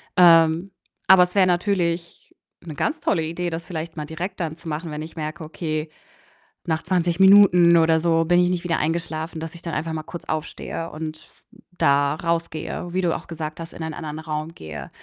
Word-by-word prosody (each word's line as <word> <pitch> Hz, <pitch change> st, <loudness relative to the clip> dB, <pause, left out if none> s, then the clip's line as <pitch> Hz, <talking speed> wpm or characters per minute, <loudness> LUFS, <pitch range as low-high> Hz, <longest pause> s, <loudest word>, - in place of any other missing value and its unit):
Ähm, 165 Hz, +1 st, +5 dB, 0.4 s
aber 185 Hz, -1 st, +8 dB
es 180 Hz, +2 st, -4 dB
wäre 190 Hz, -2 st, +5 dB
natürlich 175 Hz, -2 st, -1 dB, 0.3 s
'ne 155 Hz, -4 st, -8 dB
ganz 310 Hz, -, -1 dB
tolle 165 Hz, -5 st, +1 dB
Idee, 170 Hz, +2 st, -3 dB
das 165 Hz, 0 st, -5 dB
vielleicht 160 Hz, -1 st, -6 dB
mal 150 Hz, -, -3 dB
direkt 175 Hz, +5 st, -6 dB
dann 160 Hz, -2 st, -3 dB
zu 170 Hz, -1 st, -9 dB
machen, 155 Hz, +2 st, -4 dB
wenn 150 Hz, 0 st, -5 dB
ich 160 Hz, +1 st, -9 dB
merke: 155 Hz, +2 st, -5 dB
„Okay, 155 Hz, -1 st, -4 dB, 0.8 s
nach 160 Hz, -1 st, -1 dB
20 175 Hz, -1 st, 0 dB
Minuten 185 Hz, -3 st, +7 dB
oder 160 Hz, 0 st, +4 dB
so 165 Hz, 0 st, +2 dB
bin 175 Hz, +1 st, +4 dB
ich 180 Hz, 0 st, +3 dB
nicht 180 Hz, -1 st, -1 dB
wieder 170 Hz, -2 st, 0 dB
eingeschlafen“, 160 Hz, 0 st, -3 dB
dass 165 Hz, +1 st, -6 dB
ich 170 Hz, -, -11 dB
dann 165 Hz, -2 st, -5 dB
einfach 160 Hz, +1 st, -2 dB
mal 155 Hz, -, -3 dB
kurz 170 Hz, -, -9 dB
aufstehe 155 Hz, +1 st, -4 dB
und 155 Hz, 0 st, -6 dB
f -, -, -21 dB, 0.3 s
da 140 Hz, +1 st, +3 dB
rausgehe, 170 Hz, +1 st, -3 dB
wie 185 Hz, -, +1 dB
du 170 Hz, -2 st, +1 dB
auch -, -, -8 dB
gesagt 155 Hz, -1 st, -6 dB
hast, 165 Hz, +1 st, -8 dB
in 165 Hz, -, -7 dB
einen 160 Hz, -1 st, -4 dB
anderen 155 Hz, -2 st, -6 dB
Raum 160 Hz, +1 st, -5 dB
gehe. 80 Hz, -1 st, -8 dB
165 Hz, 205 wpm, -23 LUFS, 155-175 Hz, 0.8 s, aber